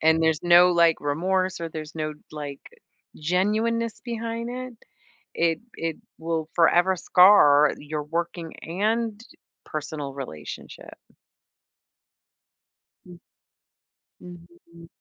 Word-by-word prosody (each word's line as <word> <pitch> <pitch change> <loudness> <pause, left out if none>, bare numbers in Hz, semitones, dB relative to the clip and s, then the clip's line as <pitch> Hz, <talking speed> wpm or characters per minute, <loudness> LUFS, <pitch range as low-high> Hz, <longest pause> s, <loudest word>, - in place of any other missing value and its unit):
and 160 +1 +3
there's 160 -2 +1
no, 175 +1 +6
like, 170 -2 +4
remorse 185 +5 -1
or 165 - -3
there's 155 -1 -8
no, 155 -1 -3 0.2
like, 145 -2 -7 0.6
genuineness 215 +7 0
behind 230 -1 -4
it, 250 -2 -7 0.6
it 165 -1 +1 0.2
it 165 -1 -3 0.2
will 160 -1 -3
forever 175 +2 +4
scar 160 -6 +6
your 150 +1 -5
working 165 +1 -4
and 215 +5 -1 0.4
personal 150 -2 -6
relationship. 100 - -9 2.1
Mm. 175 -1 -13 1.0
Mhm. 170 -1 -15
170 Hz, 95 wpm, -24 LUFS, 155-190 Hz, 2.1 s, no